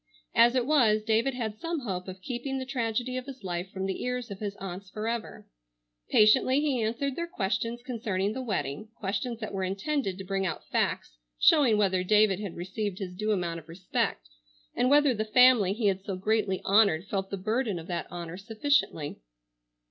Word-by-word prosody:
As 235 +2 +5
it 250 -2 +2
was, 235 -7 +3
David 225 +4 +1
had 220 -4 -4
some 330 -2 -3
hope 185 -6 -4
of 185 0 -9
keeping 270 +1 -3
the 260 - -4
tragedy 250 -1 -2
of 255 +1 -5
his 265 -5 -9
life 175 0 -3
from 190 0 -4
the 190 - -3
ears 250 -2 -3
of 195 - -6
his 205 -1 -4
aunts 190 0 -7
forever. 220 +3 -4 0.6
Patiently 255 +5 +5
he 285 -5 0
answered 255 +5 -1
their 340 +2 -3
questions 230 - -2
concerning 215 -5 -2
the 260 - -4
wedding, 195 - -3
questions 215 +4 -3
that 215 - -5
were 190 -1 -2
intended 195 +2 -1
to 190 - -6
bring 195 0 -1
out 170 -4 -3
facts - - -1 0.2
showing 240 - +5
whether 190 -3 +2
David 210 0 +4
had 200 -5 -5
received 190 +2 -4
his 190 -3 -5
due 215 +4 -1
amount 175 -4 -1
of 165 0 -18
respect, 165 - -2 0.5
and 250 - +2
whether 290 -1 +5
the 215 -1 -1
family 225 -3 +5
he 215 +2 -2
had 190 -1 +1
so 195 -1 -3
greatly 200 0 0
honored 195 -4 +4
felt 195 -1 -3
the 195 - -3
burden 215 +1 -1
of 165 - -7
that 175 -1 -3
honor 175 0 -6
sufficiently. 215 - 0
215 Hz, 190 wpm, -28 LUFS, 190-245 Hz, 0.6 s, As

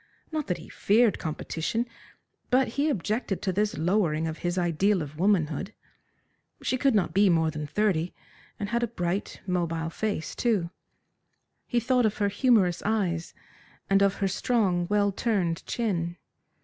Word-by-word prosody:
Not 310 -2 -2
that 180 - -1
he 160 - -11
feared 220 +1 +3
competition, 160 +7 -2 0.6
but 255 0 +3
he 285 +6 0
objected 215 - -1
to 190 - 0
this 210 +2 0
lowering 165 -2 +1
of 160 0 -4
his 175 +1 -2
ideal 180 +2 +2
of 150 +1 -10
womanhood. 185 -1 +1 0.9
She - - +1
could 265 -1 +2
not 185 -6 +1
be 200 +2 +5
more 160 -2 +3
than 150 0 -5
thirty, 180 0 +1 0.5
and 205 - -3
had 235 +1 0
a 240 - +1
bright, 185 -3 -3
mobile 165 -3 -1
face, 205 -4 -2
too. 200 -8 0 1.0
He 240 - +1
thought 245 0 +3
of 210 - -3
her 205 -1 +1
humorous 205 -5 +3
eyes, 185 -6 -1 0.6
and 195 0 +5
of 200 -1 +3
her 195 - 0
strong, 190 -3 +1
well 205 -1 +3
turned 190 -6 0
chin. 175 -7 -1
195 Hz, 155 wpm, -27 LUFS, 170-220 Hz, 1.0 s, be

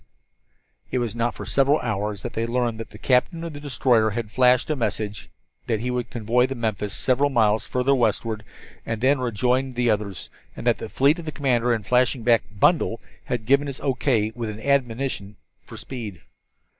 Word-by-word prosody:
It - - -1
was 120 -3 -2
not 115 0 -1
for - - -7
several 140 +2 +3
hours 105 -2 -3
that 120 - -5
they 115 +1 -1
learned 120 -1 -1
that 115 - -7
the - - -12
captain 135 +6 +1
of 165 -2 -5
the 145 - -7
destroyer 125 -5 +2
had 110 0 -4
flashed 125 +3 +3
a - - +1
message 110 -5 -3 0.4
that 110 -3 0
he 125 +1 -2
would 125 -1 -2
convoy 120 +2 +1
the 135 - -4
Memphis 105 -4 -2
several 135 +2 +2
miles 110 -5 +2
further 125 +2 +1
westward, 115 -3 0 0.4
and 115 -1 -3
then 130 +3 +3
rejoin 125 +2 0
the 120 -1 +2
others, 100 -4 -3 0.2
and - - -8
that - - +3
the - - -6
fleet 150 +6 +2
commander, 125 -4 +1
in 115 -3 0
flashing 125 +2 +2
back 115 -2 +4
"bundle," 105 - +2 0.3
had 120 -3 -3
given 140 +4 +3
his 135 -1 -5
O. 135 - +1
K., 115 -5 +1
with 115 -1 -4
an 105 0 -7
admonition 125 -5 -1 0.3
for - - -10
speed. 110 -10 -7
120 Hz, 190 wpm, -24 LUFS, 110-130 Hz, 0.4 s, back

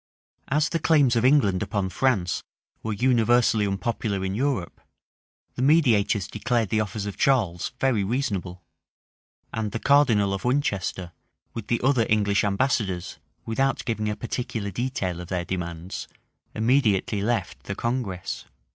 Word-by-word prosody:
As 150 +2 +1
the 165 - -1
claims 145 -6 +4
of 115 - +2
England 120 -9 +4
upon 100 -2 -1
France 100 -6 0 0.4
were 110 - -3
universally 115 -2 +3
unpopular 100 -1 -2
in 95 - -2
Europe, 120 -6 -2 0.7
the - - -5
mediators 120 - +3
declared 110 0 -1
the 110 - +1
offers 105 0 -4
of 100 - -5
Charles 105 -11 +1
very 125 -7 +2
reasonable, 95 -6 -2 0.9
and 110 -2 -2
the 115 - -3
cardinal 115 -9 +4
of 95 - -4
Winchester, 100 -9 -1 0.4
with 115 -3 -6
the 120 - +1
other 130 -4 +3
English 105 -2 +2
ambassadors, 100 -4 -1 0.3
without 135 +4 0
giving 110 -2 -1
a 105 - -2
particular 115 -3 -4
detail 95 -6 -2
of 90 - -8
their 90 -1 -2
demands, 85 0 -5 0.5
immediately 110 -4 +2
left 110 -3 -2
the 100 - -4
congress. 115 -6 -3
110 Hz, 140 wpm, -25 LUFS, 95-125 Hz, 0.9 s, claims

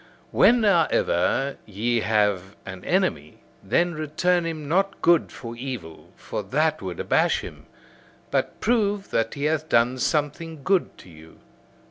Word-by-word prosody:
When, 240 -1 +5
however, 140 - +2
ye 115 +4 0
have 105 -3 0
an 95 -2 -8
enemy, - - -1 0.2
then 170 - +1
return 165 +3 0
him 155 -3 -5
not 195 +5 0
good 170 -1 +4
for 115 -1 -8
evil: 120 -10 -7
for - - -5
that 155 +9 0
would 90 -3 -6
abash - - +2
him. - - -11 0.6
But - - -1
prove 205 -4 0
that 115 0 0
he 140 - -5
hath 155 +1 0
done 120 +2 +2
something 150 +2 -2
good 190 +3 +1
to - - -15
you. 80 0 -16
140 Hz, 140 wpm, -24 LUFS, 105-170 Hz, 0.6 s, When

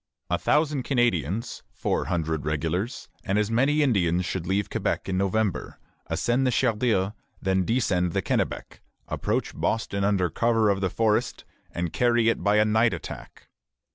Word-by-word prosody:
A - - +1
thousand 150 -2 +1
Canadians, 115 - 0
four - - -1
hundred 80 -3 -1
regulars, 80 - -2 0.2
and 100 -2 0
as 105 +1 +1
many 140 +6 +3
Indians 90 - +2
should 90 -2 -3
leave 100 +2 0
Quebec - - -2
in 95 - -1
November, 100 -1 -1 0.3
ascend 125 +2 +1
the - - +2
Chaudière, 110 -5 +1 0.3
then 95 -1 +1
descend 95 -7 +1
the - - 0
Kennebec, - - -2 0.3
approach - - -2
Boston 100 -3 -1
under 95 -4 +1
cover 115 -3 +2
of 95 -1 -1
the 95 - +1
forest, 110 +2 0 0.2
and 85 -1 -4
carry 120 -2 +3
it 115 - -1
by 105 +2 +3
a 105 - +5
night 110 +2 +3
attack. - - -10
105 Hz, 155 wpm, -26 LUFS, 90-120 Hz, 0.3 s, a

